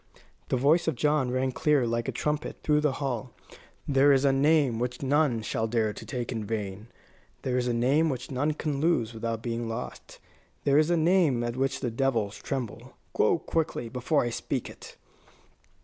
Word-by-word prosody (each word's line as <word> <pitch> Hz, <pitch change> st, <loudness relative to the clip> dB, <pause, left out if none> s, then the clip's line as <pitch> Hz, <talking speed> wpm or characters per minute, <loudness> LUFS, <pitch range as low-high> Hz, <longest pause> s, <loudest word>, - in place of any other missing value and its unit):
The -, -, +1 dB
voice 155 Hz, +7 st, +3 dB
of 160 Hz, -, +1 dB
John 150 Hz, 0 st, +1 dB
rang 130 Hz, +1 st, 0 dB
clear, 145 Hz, 0 st, +2 dB
like 115 Hz, 0 st, -1 dB
a -, -, 0 dB
trumpet, 150 Hz, 0 st, -3 dB
through 150 Hz, -1 st, +3 dB
the 150 Hz, -3 st, +1 dB
hall. 130 Hz, -3 st, -3 dB, 0.5 s
"There 140 Hz, 0 st, +5 dB
is 135 Hz, 0 st, +3 dB
a 135 Hz, -, +5 dB
name 140 Hz, -4 st, +3 dB
which 125 Hz, +2 st, -3 dB
none 135 Hz, -5 st, +2 dB
shall 110 Hz, +2 st, -1 dB
dare 110 Hz, -2 st, 0 dB
to 110 Hz, -, -10 dB
take 120 Hz, +2 st, -4 dB
in 110 Hz, -3 st, -3 dB
vain. 105 Hz, -1 st, -4 dB, 0.6 s
There 130 Hz, -1 st, -1 dB
is 125 Hz, -1 st, 0 dB
a -, -, +1 dB
name 140 Hz, +7 st, +3 dB
which 130 Hz, -1 st, -4 dB
none 145 Hz, +4 st, 0 dB
can 150 Hz, -2 st, -3 dB
lose 140 Hz, -8 st, +1 dB
without 115 Hz, 0 st, -4 dB
being 115 Hz, -1 st, -3 dB
lost. 115 Hz, +2 st, -7 dB, 0.5 s
There 140 Hz, +1 st, +4 dB
is 155 Hz, +1 st, +2 dB
a 175 Hz, -, +3 dB
name 160 Hz, -7 st, +3 dB
at 120 Hz, 0 st, -3 dB
which 135 Hz, +1 st, -1 dB
the 125 Hz, -3 st, -1 dB
devils 115 Hz, -5 st, 0 dB
tremble. 130 Hz, -6 st, -5 dB, 0.2 s
Go -, -, +3 dB
quickly, 160 Hz, -7 st, -2 dB
before 130 Hz, +5 st, +1 dB
I 120 Hz, -, -2 dB
speak -, -, -3 dB
it!" -, -, -13 dB
130 Hz, 190 wpm, -28 LUFS, 115-150 Hz, 0.6 s, There